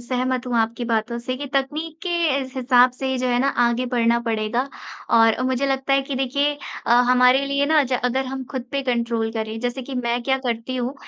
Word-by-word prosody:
सहमत 255 +1 -2
हूँ 245 -1 -1
आपकी 230 +2 -1
बातों 230 0 -1
से 255 +2 -4
कि 285 +1 -6
तकनीक 305 +4 -2
के 360 - -3 0.3
इस 260 -1 -7
हिसाब 250 -1 +4
से 265 +1 -5
ही 260 -1 -1
जो 255 - -1
है 245 - +2
ना 275 - +2 0.2
आगे 235 +2 +1
बढ़ना 235 -1 +2
पड़ेगा 230 +3 -1 0.5
और 225 +1 +4
मुझे 260 +2 0
लगता 270 0 0
है 275 - +4
कि 275 0 -5
देखिए 280 +3 0 0.3
अ, 235 - +3 0.2
हमारे 250 +2 +5
लिए 280 +1 +1
ना 310 -1 +4
ज 255 - -5
अगर 260 +2 +1
हम 265 0 -5
खुद 260 -3 -3
पे 280 - 0
कंट्रोल 235 -3 -1
करें। 220 0 -4
जैसे 245 +2 -3
कि 265 +1 -7
मैं 240 -1 -1
क्या 265 +1 +1
करती 235 +2 -2
हूँ 250 +2 -2
255 Hz, 220 wpm, -22 LUFS, 235-270 Hz, 0.5 s, हमारे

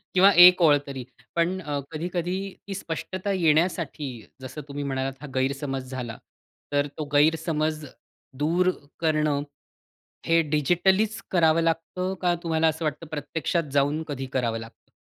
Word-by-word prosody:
किंवा 195 +2 +7
1 180 0 +7
ओळ 150 -3 +6
तरी 135 -2 -5 0.3
पण 175 +3 +1
अ, 145 -4 -3
कधी-कधी 175 +3 -2 0.3
ती 195 - -4
स्पष्टता 185 +2 -4
येण्यासाठी 165 -3 +1 0.3
जसं 130 +4 -7
तुम्ही 145 0 -5
म्हणालात 135 -1 -2
हा 150 - -7
गैरसमज 135 0 -2
झाला. 120 -4 -5 0.5
तर 145 0 +1
तो 155 - -3
गैरसमज 155 0 +2 0.6
दूर 175 +4 +3 0.3
करणं 155 -3 +1 0.9
हे 165 0 +4
डिजिटलीच 190 +8 +2
करावं 165 -2 +4
लागतं 165 +3 -1
का? 175 -1 +3
तुम्हाला 160 -1 +1
असं 160 +1 -3
वाटतं 155 +2 -3
प्रत्यक्षात 155 +1 -2
जाऊन 145 +3 +2
कधी 135 -2 -4
करावं 120 -3 0
लागतं? 115 0 -13
155 Hz, 135 wpm, -25 LUFS, 145-175 Hz, 0.9 s, किंवा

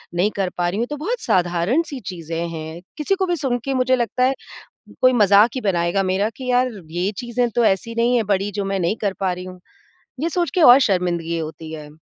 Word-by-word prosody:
नहीं 195 +5 +2
कर 190 -2 0
पा 175 -1 +1
रही 195 +4 -3
हूँ। 235 - +1
तो 295 - -3
बहुत 445 - -3
साधारण-सी 190 - 0
चीज़ें 170 -2 -4
हैं। 160 +1 -7 0.2
किसी 310 +6 0
को 385 -1 0
भी 350 - +1
सुनके 270 -3 -2
मुझे 255 0 +2
लगता 245 +1 -1
है 260 +1 +3 0.7
कोई 255 0 +5
मज़ाक 205 -1 +5
ही 260 - -2
बनाएगा 180 -1 +1
मेरा 190 +3 0
कि 255 -1 -3
यार 250 +1 +2 0.2
ये 180 +4 -1
चीज़ें 240 0 -1
तो 240 - +3
ऐसी 220 +3 0
नहीं 235 +2 +2
है 230 - +1
बड़ी 195 +2 -1
जो 200 0 -3
मैं 195 0 -1
नहीं 180 +5 0
कर 200 -3 0
पा 190 -2 +1
रही 180 +1 -7
हूँ। 185 0 -10 0.6
ये 325 - 0
सोच 345 0 0
के 365 - +2
और 245 -2 +9
शर्मिंदगी 175 -3 -1
होती 160 0 -7
है। 155 -2 -8
205 Hz, 225 wpm, -21 LUFS, 175-250 Hz, 0.7 s, और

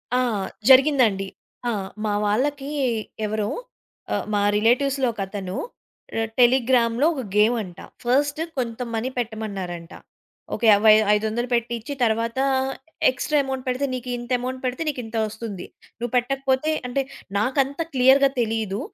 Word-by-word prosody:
ఆ! - - +3 0.5
జరిగిందండి. 255 -8 +5 0.4
ఆ! - - +1 0.3
మా 210 - 0
వాళ్ళకి 270 +7 0 0.6
ఎవరో 210 0 -1 0.7
ఆహ్, - - -2
మా 205 - +2
రిలేటివ్స్‌లో 255 +5 +2
ఒక 210 - -6
అతను 190 -1 -5 0.8
టెలిగ్రామ్‌లో 245 0 +4
ఒక 275 - -4
గేమంట. 210 -4 +2 0.2
ఫస్టు 285 +5 +1
కొంత 235 -2 -2
మనీ 225 +3 -1
పెట్టమన్నారంట. 200 -7 -4 0.6
ఒకే 230 - 0
యవ్ 205 +1 +4 0.3
500 220 +3 -1
పెట్టిచ్చి, 235 +2 -1
తర్వాత 230 +1 0 0.7
ఎక్స్‌ట్రా 275 +4 0
అమౌంట్ 265 -1 -4
పెడితే 255 +2 0
నీకింత 245 -1 -5
అమౌంట్ 255 +1 -4
పెడితే 255 +5 -1
నీకింత 240 -5 -5
వస్తుంది. 215 -3 -6 0.3
నువ్వు 240 0 -4
పెట్టకపోతే 270 +3 +1 0.2
అంటే 270 +2 0 0.4
నాకంత 270 +5 0 0.2
క్లియర్‌గా 265 +2 +6
తెలీదు. 220 -3 -1
240 Hz, 115 wpm, -23 LUFS, 220-265 Hz, 0.8 s, క్లియర్‌గా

